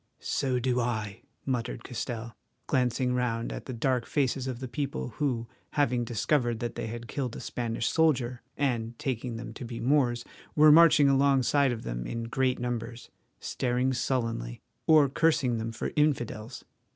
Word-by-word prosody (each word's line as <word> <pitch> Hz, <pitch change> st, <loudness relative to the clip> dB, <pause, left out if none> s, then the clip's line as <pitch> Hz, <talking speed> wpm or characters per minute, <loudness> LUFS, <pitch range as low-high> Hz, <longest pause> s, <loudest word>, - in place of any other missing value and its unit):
"So 130 Hz, -2 st, 0 dB
do 125 Hz, 0 st, +1 dB
I," 110 Hz, -4 st, -2 dB, 0.2 s
muttered 125 Hz, -2 st, -2 dB
Castell, 115 Hz, -2 st, -5 dB, 0.3 s
glancing 125 Hz, -1 st, +1 dB
round 120 Hz, -2 st, -1 dB
at -, -, -7 dB
the -, -, -4 dB
dark 125 Hz, +1 st, 0 dB
faces 135 Hz, -2 st, 0 dB
of 125 Hz, -2 st, -4 dB
the 130 Hz, -, -5 dB
people, 140 Hz, -1 st, -3 dB
who, 125 Hz, -5 st, 0 dB, 0.3 s
having 125 Hz, -4 st, +1 dB
discovered 120 Hz, +1 st, 0 dB
that 120 Hz, 0 st, -3 dB
they -, -, -4 dB
had 120 Hz, +1 st, -6 dB
killed 130 Hz, -3 st, -3 dB
a -, -, -6 dB
Spanish 115 Hz, -1 st, -2 dB
soldier, 130 Hz, -7 st, +2 dB, 0.2 s
and 120 Hz, -5 st, -1 dB
taking 125 Hz, -2 st, -3 dB
them 115 Hz, +1 st, -7 dB
to 135 Hz, -, -8 dB
be 115 Hz, -1 st, -6 dB
Moors, 125 Hz, -2 st, +2 dB, 0.3 s
were 150 Hz, 0 st, +8 dB
marching 155 Hz, -2 st, +7 dB
alongside 140 Hz, 0 st, +3 dB
of 115 Hz, -2 st, -4 dB
them -, -, -4 dB
in 115 Hz, 0 st, -3 dB
great 130 Hz, +2 st, 0 dB
numbers, 120 Hz, -1 st, -4 dB, 0.3 s
staring 125 Hz, +1 st, 0 dB
sullenly, 115 Hz, -, -2 dB, 0.3 s
or 155 Hz, -3 st, +7 dB
cursing 135 Hz, -5 st, +2 dB
them 115 Hz, +1 st, -3 dB
for 115 Hz, -, -4 dB
infidels. 120 Hz, -7 st, -1 dB
125 Hz, 160 wpm, -28 LUFS, 115-135 Hz, 0.3 s, were